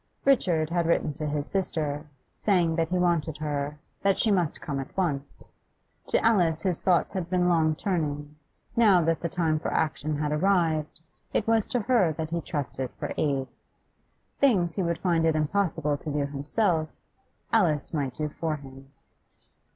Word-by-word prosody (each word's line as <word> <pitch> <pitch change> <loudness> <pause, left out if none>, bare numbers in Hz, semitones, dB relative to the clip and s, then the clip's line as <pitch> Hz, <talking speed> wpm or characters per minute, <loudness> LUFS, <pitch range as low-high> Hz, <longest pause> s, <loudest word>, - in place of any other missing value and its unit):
Richard 170 - +3
had 170 -1 +1
written 160 -3 +1
to 150 +2 -4
his 145 -1 -2
sister, 155 -6 -2 0.3
saying 175 -5 +2
that 165 -1 0
he 180 - 0
wanted 170 -4 +1
her, 150 -1 -3 0.2
that 195 -1 +2
she 220 - +2
must 180 -6 +1
come 140 -3 -4
at 135 - -8
once. 145 -7 -2 0.6
To - - +1
Alice 175 -8 +3
his 180 -4 0
thoughts 180 -2 +2
had 180 -3 -3
been 180 -1 +2
long 160 -3 +3
turning; 150 -5 -2 0.4
now 210 -6 +5
that 165 0 +1
the 170 - -3
time 160 -3 0
for - - -3
action 155 -1 -1
had 150 0 -1
arrived, 160 -2 +1 0.3
it 210 - +1
was 225 -2 +2
to 245 - 0
her 210 -8 +3
that 160 +1 -5
he 170 0 -1
trusted 135 -5 -4
for - - -4
aid. 135 -3 0 0.9
Things 190 -12 +3
he 195 - -1
would 170 -2 0
find 170 -3 +1
it 160 -1 +3
impossible 155 -2 0
to 155 - -7
do 145 0 0
himself, 155 +4 0 0.6
Alice 165 -11 +2
might 140 -5 -2
do 150 - -2
for 155 +1 -3
him. 135 -1 -12
160 Hz, 170 wpm, -27 LUFS, 150-180 Hz, 0.9 s, now